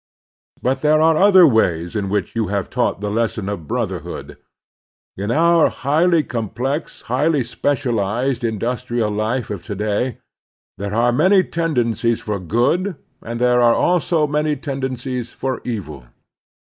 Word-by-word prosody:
But 130 +1 0
there 155 0 +4
are 160 +1 +4
other 190 0 +7
ways 90 - +1
in 100 -2 -1
which 105 +2 -2
you 115 -3 0
have 100 -1 -2
taught 95 - 0
the 105 0 -2
lesson 110 -2 -1
of 100 -7 -5
brotherhood. - - -4 0.8
In 100 +2 -4
our 165 +5 +4
highly 160 +4 +2
complex, 125 +6 -4
highly 135 +4 +1
specialized 125 -1 -1
industrial 115 0 -1
life 110 +3 -2
of 100 -4 -4
to 105 +2 -6
day 105 +4 -1 0.6
there 100 +1 -3
are 120 +1 +3
many 185 +9 +4
tendencies 120 - 0
for 105 -2 -3
good 125 - 0 0.3
and 115 +1 -5
there 125 0 +3
are 120 -1 +5
also 170 -3 +2
many 150 +1 0
tendencies 130 -3 -4
for 130 -1 -3
evil. 80 - -5
120 Hz, 140 wpm, -20 LUFS, 105-150 Hz, 0.8 s, other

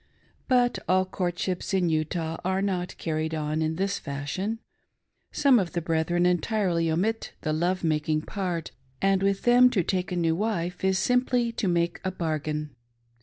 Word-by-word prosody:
But 245 -2 +3
all 185 0 +4
courtships 180 0 -2
in 180 -2 +2
Utah 160 +1 -1
are 190 +1 0
not 180 -3 -2
carried 160 0 -2
on 155 0 -1
in 160 0 0
this 195 +3 -1
fashion. 145 +10 -3 0.7
Some 275 -4 +4
of 180 -4 -2
the 170 - -1
brethren 165 +2 +1
entirely 180 -2 +1
omit 205 +8 -1
the 155 - -1
love 175 +4 0
making 155 -1 0
part, 180 -5 -3 0.3
and 195 -1 +2
with 195 0 +1
them 245 +1 +6
to 195 -7 +1
take 185 +1 -1
a - - -1
new 165 -2 +1
wife 180 -3 -2
is 190 0 +2
simply 245 +3 +2
to 220 - -2
make 170 -1 0
a 190 - 0
bargain. 150 -4 -3
180 Hz, 165 wpm, -26 LUFS, 160-195 Hz, 0.7 s, them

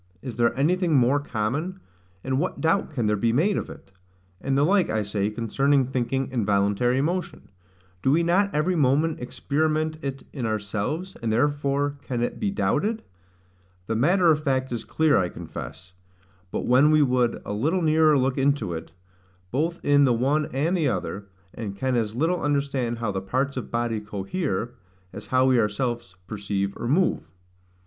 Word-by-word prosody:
Is 125 -3 -6
there 120 0 +2
anything 170 +2 +2
more 130 +2 +4
common? 145 - -3 0.4
And 130 0 0
what - - -2
doubt 165 +5 +1
can 130 -8 -2
there 105 0 +2
be 115 +3 +1
made 175 - +2
of - - -3
it? - - -12 0.5
And 135 0 0
the 140 - +4
like, 190 +3 +3
I 110 -1 0
say, 100 0 -1
concerning 135 +5 +1
thinking 130 +1 -1
and 120 -4 0
voluntary 105 +6 +2
motion. 175 +3 -3 0.5
Do 130 - +1
we 160 +5 +3
not 185 +4 +3
every 165 +4 +1
moment 150 +2 +2
experiment 155 +5 -1
it 135 -2 -5
in 125 -5 -3
ourselves, 110 - -3
and 115 -1 -1
therefore 145 +3 0
can 120 -4 -3
it - - -3
be 210 - 0
doubted? 215 +2 0 0.8
The 115 - -2
matter 170 - +4
of 150 0 0
fact 130 -2 0
is 120 -2 -3
clear, 160 -6 +2
I 90 -2 0
confess; 90 +1 -9 0.6
but - - -3
when 130 +4 +5
we 155 -1 +5
would 125 -3 +1
a - - -4
little 160 - 0
nearer 155 -1 +4
look 130 0 0
into 140 -9 +1
it, 80 0 -7 0.6
both 165 +6 -1
in 145 0 +5
the 125 - +3
one 140 +6 +1
and 150 +8 0
the 160 -5 +1
other; 100 +1 -3 0.3
and 100 -4 -6
can 130 +3 0
as 110 -2 -1
little 165 +7 0
understand 140 -5 -1
how 115 -3 -2
the 95 -1 -3
parts 130 +8 -1
of 125 - -5
body 115 -2 -1
cohere, 105 - -3 0.4
as - - -9
how 130 0 +3
we 130 -2 +4
ourselves 115 -1 -2
perceive 100 -1 -3
or 120 - -4
move. 165 - +1
135 Hz, 175 wpm, -25 LUFS, 115-155 Hz, 0.8 s, when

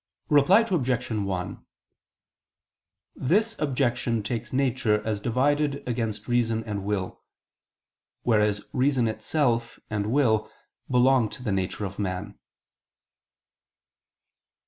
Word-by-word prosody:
Reply 150 +9 +6
Obj. 130 - -1
1: 100 -4 -3 1.5
This 215 - +1
objection 125 -5 0
takes 115 +2 -4
nature 130 -5 +1
as 110 -2 -1
divided 140 +6 0
against 115 -3 -2
reason 115 -2 +1
and 105 -3 -4
will; 100 -2 -3 1.0
whereas 105 -3 +2
reason 130 -2 +2
itself 115 +1 -1
and 105 0 -1
will 120 -6 +2 0.4
belong 125 -2 +4
to 125 - -10
the 110 - -1
nature 95 +2 -1
of 95 +1 -7
man. 90 -3 -4
120 Hz, 100 wpm, -26 LUFS, 105-135 Hz, 1.5 s, Reply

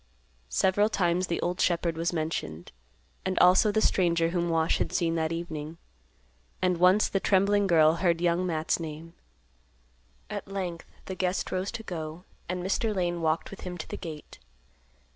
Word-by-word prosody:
Several 190 - +2
times 180 -2 +1
the 170 - -1
old 180 +1 -1
shepherd 170 -1 +1
was 165 +1 -1
mentioned, 155 - -4 0.5
and 185 0 -2
also 185 +4 +6
the 215 +1 +1
stranger 170 -5 +2
whom 175 0 -1
Wash 165 -1 +1
had - - -1
seen 165 -1 +1
that 160 -1 0
evening. 165 -2 -5 0.8
And 180 -1 +1
once, 185 +4 +5
the 195 - 0
trembling 200 +1 +3
girl 160 -2 +5
heard 170 -1 +2
Young 175 +1 +1
Matt's 160 -3 0
name. 160 +1 -7 1.1
At - - -6
length 185 -4 -5 0.2
the 190 - -5
guest 185 +1 -1
rose 185 +1 -1
to 230 -1 -6
go, 160 -3 -6 0.3
and 180 0 -2
Mr. 210 +3 0
Lane 175 -2 -1
walked 160 0 0
with 195 - -10
him 180 -1 -6
to 160 - -7
the - - -4
gate. 160 -4 -9
175 Hz, 165 wpm, -28 LUFS, 165-185 Hz, 1.1 s, also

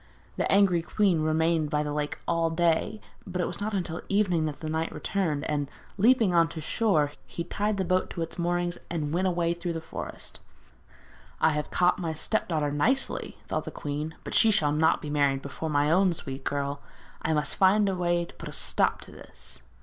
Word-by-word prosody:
The - - 0
angry 195 -4 +4
queen 180 -1 +2
remained 160 0 +2
by 150 -1 +1
the 150 -1 -3
lake 150 0 -2
all 165 -1 +2
day, 170 +5 +1 0.3
but 185 -1 -4
it 180 - +2
was 175 - -5
not 210 0 -1
until 175 -3 -2
the - - -8
evening 190 -6 +2
that 150 -2 -4
the 155 - -5
knight 160 +1 -1
returned, 165 -8 -1
and 145 -2 -1 0.3
leaping 225 -3 +5
on 165 -1 +4
shore, 160 -1 +1 0.2
he 170 - -4
tied 210 +3 -1
the 190 - 0
boat 185 +1 +1
to 170 - -3
its 165 - -6
moorings 175 0 0
and 155 -3 -2
went 185 +2 +2
away 170 -2 +1
through 170 0 -4
the 165 - -3
forest. 160 - -6 1.0
'I 160 - +4
have 150 0 -2
caught 180 +1 +2
my 165 -3 -2
step 220 +7 -1
daughter 155 -4 0
nicely,' 230 - 0
thought - - -2
the - - -4
queen. 150 +2 -4
'But - - -6
she 225 - +6
shall 195 -9 +3
not 155 +2 +2
be 150 - -4
married 140 -2 +2
before 155 +3 -4
my 145 0 +2
own 185 +1 +4
sweet 135 -4 -5
girl. 140 0 -2 0.4
I 160 - 0
must 150 -2 0
find 200 +2 +4
a 195 - +1
way 175 -1 +1
to - - -15
put - - -8
a - - -8
stop - - +1
to - - -12
this.' - - -8
165 Hz, 210 wpm, -28 LUFS, 150-185 Hz, 1.0 s, she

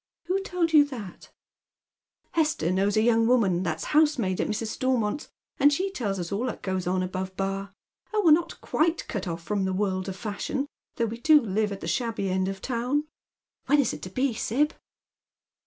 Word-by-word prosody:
" - - -66
Who 385 +2 +1
told 355 -4 -1
you 300 -2 +8
that? 230 -10 -9 0.3
" - - -67
" - - -49
Hester 305 - +1
knows 195 +3 +1
a 215 - +4
young 230 -1 +4
woman 205 -8 +3
that's 160 -3 -2
housemaid 285 - +3
at - - -1
Mrs. 215 +1 -2
Stormont's, 255 +2 -1 0.3
and 290 +1 +6
she 380 +7 0
tells 210 - -2
us 175 -2 -4
all 220 +6 -1
that 240 - -5
goes 185 -2 -2
on 185 0 +1
Above 185 +1 -4
Bar. 195 0 -2 0.4
Oli, 425 -2 +1
we're 325 - +7
not 330 +2 +3
quite 330 +1 0
cut 200 -6 -4
off 170 -1 -4
from 200 +1 -1
the 190 - -1
world 190 -1 -1
of 190 - -5
fashion, 215 +7 -3 0.3
though 235 - +1
we 230 +1 -5
do 305 +4 +6
live 215 -3 -1
at 195 - -6
the - - -5
shabby 225 -6 -1
end 185 0 +1
of 195 - -2
the - - -6
town. 255 +4 0 0.6
When 290 +2 +5
is 270 - +2
it 150 - -7
to 185 - -6
be, 255 +6 0
Sib 280 +8 0
220 Hz, 210 wpm, -26 LUFS, 190-280 Hz, 0.6 s, you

